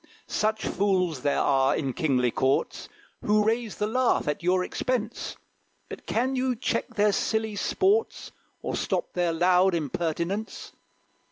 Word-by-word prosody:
Such 220 +1 -1
fools 185 -7 0
there 145 +1 +1
are 135 -1 +3
in 135 -4 -2
kingly 125 -5 +1
courts, 130 +3 0 0.3
Who 210 0 +3
raise 225 -1 0
the 210 - -1
laugh 250 -2 +1
at 150 - -1
your 180 +1 +2
expense; 240 +2 -3 0.5
But - - -9
can 255 +4 0
you 255 -1 0
check 240 - -2
their 210 0 +3
silly 220 +1 -1
sports, 395 - 0 0.3
Or - - -2
stop - - -2
their 175 -1 +1
loud 180 +2 +3
impertinence? 170 - -3
195 Hz, 140 wpm, -26 LUFS, 165-220 Hz, 0.5 s, are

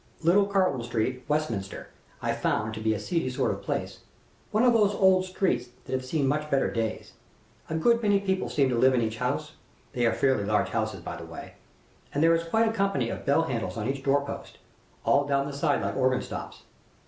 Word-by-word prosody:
"Little 195 +5 +4
Carton 185 -10 +1
Street, 120 +2 -2
Westminster, 125 -10 -2 0.3
I - - +1
found 110 0 -1
to 110 - -5
be 110 0 +1
a - - -4
seedy 145 +5 -1
sort 125 - 0
of - - -5
place - - -3 0.5
one 215 +3 +2
of 245 -1 +5
those 205 -3 +3
old 190 -1 +4
streets 155 -10 -1 0.2
that - - -9
have 130 0 -1
seen 140 +1 0
much 150 +2 -1
better 135 -2 +1
days. 115 -1 -3 0.6
A 160 - -2
good 235 +8 +3
many 205 -2 +3
people 190 -1 -1
seem 140 -2 +2
to 120 -2 0
live 130 +1 +5
in 120 - +2
each 110 0 -2
house - - -2 0.4
they 120 -1 +2
are - - +2
fairly 130 -6 +2
large 105 +1 +1
houses, - - -2
by - - -6
the - - -8
way - - -9 0.6
and 145 - +2
there 165 0 +6
is 165 0 +1
quite 225 +4 +3
a 220 - 0
company 195 - 0
of - - -7
bell 145 +4 +4
handles 115 - -3
on 110 0 -2
each 135 0 -2
doorpost, 140 +1 -1 0.5
all 140 +1 +3
down 140 -1 +1
the 145 - -5
side 140 - +1
like - - -2
organ 130 -1 +2
stops. - - -7
140 Hz, 215 wpm, -27 LUFS, 120-185 Hz, 0.6 s, there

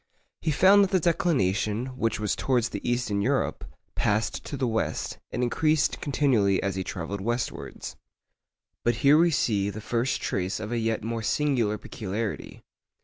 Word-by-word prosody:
He 160 - -1
found 190 +7 +6
that 195 - +1
the 185 - +2
declination, 120 - +1
which 115 -4 -1
was 105 -1 0
towards 120 -3 +1
the - - -5
east 120 -2 -1
in 100 0 +1
Europe, - - 0 0.3
passed 105 +2 0
to 140 - -5
the 130 - 0
west, 110 -2 -2
and 125 - -1
increased 155 +4 +1
continually 125 -9 +2
as 100 -1 0
he 95 - -2
travelled 95 +3 -5
westwards. 120 +3 -4 0.9
But 120 0 +2
here 145 +3 +7
we 170 +1 +5
see 105 -10 +1
the 105 +1 -6
first 120 +4 -1
trace 95 0 -2
of 110 +1 -5
a 120 - 0
yet 115 -1 -1
more 115 +1 -3
singular 120 -4 +1
peculiarity. 105 0 -5
115 Hz, 165 wpm, -26 LUFS, 105-140 Hz, 0.9 s, here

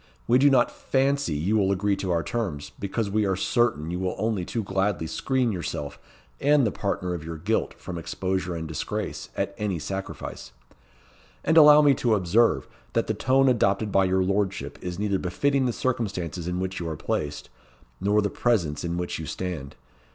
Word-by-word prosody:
We 120 +3 +5
do 145 +2 +6
not 130 -3 +4
fancy 135 - 0
you 90 +9 +1
will 100 -2 +2
agree 100 +1 +1
to 95 - -3
our 85 -2 +1
terms; 90 -9 -3
because 100 +1 -2
we 110 +1 +2
are 95 - +1
certain 95 -6 +1
you 90 - -3
will 95 -1 -2
only 110 -2 -1
too 115 +5 -3
gladly 95 -2 0
screen 130 +7 0
yourself 75 -6 -4 0.4
and 145 -2 +4
the 105 - +1
partner 90 -3 -2
of 85 -3 -5
your 80 0 -6
guilt 105 +8 -1
from 85 -2 -6
exposure 95 +1 -2
and 80 -1 -4
disgrace, 80 - -4
at - - -1
any 105 -4 -1
sacrifice. 95 -6 -6 0.9
And 160 - +2
allow 150 -1 +9
me 145 -1 +6
to 120 -4 +2
observe, 105 +5 +2 0.3
that - - +1
the - - -1
tone 135 +2 +3
adopted 105 -4 +2
by 95 0 +4
your 95 0 +2
lordship 100 +1 -1
is 90 -1 -5
neither 100 -1 0
befitting 135 +9 +1
the - - +1
circumstances 95 - -2
in 90 0 -2
which 95 0 -3
you 85 -2 -3
are 80 - -4
placed, 75 0 -3 0.5
nor 105 +2 +2
the 100 - -1
presence 85 -12 0
in 85 0 -2
which 90 -2 -3
you 80 - -5
stand. 80 -4 -5
95 Hz, 190 wpm, -26 LUFS, 85-115 Hz, 0.9 s, allow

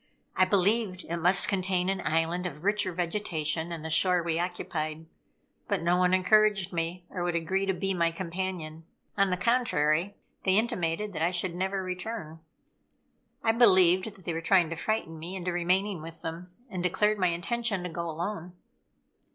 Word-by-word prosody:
I 185 - +5
believed 195 0 +1
it 170 - -3
must 180 +3 +3
contain 185 -2 0
an 190 -1 -1
island 165 +3 0
of 150 -1 -9
richer 205 -1 +1
vegetation 170 -2 -1
than 165 -2 -6
the 160 - -4
shore 180 +1 +3
we 165 -1 -1
occupied. 160 -3 -3 0.6
But - - -1
no 175 +1 +3
one 180 0 +3
encouraged 195 0 +3
me 170 +1 -3
or 180 - -4
would 175 -1 -1
agree 190 +4 0
to 190 - +2
be 195 +1 -1
my 170 -2 +2
companion. 165 -2 -5 0.3
On 195 -1 +3
the 180 - 0
contrary, 200 -6 +1 0.3
they 190 0 +3
intimated 210 -3 -1
that 155 - -4
I 165 - +3
should 180 0 -1
never 190 +2 -2
return. 185 -3 -5 1.0
I 225 - +4
believed 190 -4 +4
that 190 - -18
they 170 - -3
were 165 - -3
trying 170 -1 +3
to - - -2
frighten 165 -3 -2
me 175 +4 -6
into 180 -1 -3
remaining 180 +1 0
with 165 +1 -10
them, 170 +2 -6 0.2
and 185 -6 -5
declared 210 +4 +1
my 185 - +3
intention 200 +4 -1
to 180 - -4
go 170 0 -4
alone. 175 +2 -4
180 Hz, 175 wpm, -28 LUFS, 165-195 Hz, 1.0 s, I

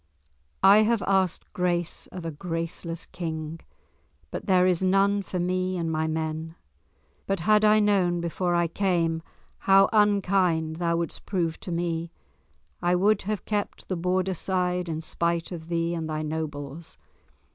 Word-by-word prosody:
I 200 +2 +8
have 220 0 +2
asked 190 -3 0
grace 175 -1 -1
of 180 -2 -8
a 165 - -2
graceless 165 +1 -5
King, 160 -3 -5 0.7
but - - -6
there 185 -2 +5
is 180 -1 +2
none 195 +2 +3
for 185 -1 -4
me 185 +1 0
and 165 -2 -1
my 160 0 0
men. 160 0 -3 0.7
But 195 -3 -1
had 215 +3 +4
I 215 0 +6
known 190 -4 +2
before 175 +1 -1
I 170 0 +2
came 170 -2 0 0.5
how 195 0 +7
unkind 185 -6 +2
thou 170 -1 0
wouldst 170 -2 -4
prove 170 -5 -1
to 180 - -7
me, 170 -1 -2 0.7
I 175 0 +2
would 200 +3 +3
have 215 -2 -2
kept 205 -1 -3
the 185 - 0
Borderside 180 0 0
in 160 -1 -3
spite 170 +1 -1
of 165 -2 -7
thee 170 0 0
and 160 -2 -3
thy 155 0 -2
nobles. 155 0 -5
175 Hz, 150 wpm, -26 LUFS, 165-190 Hz, 0.7 s, I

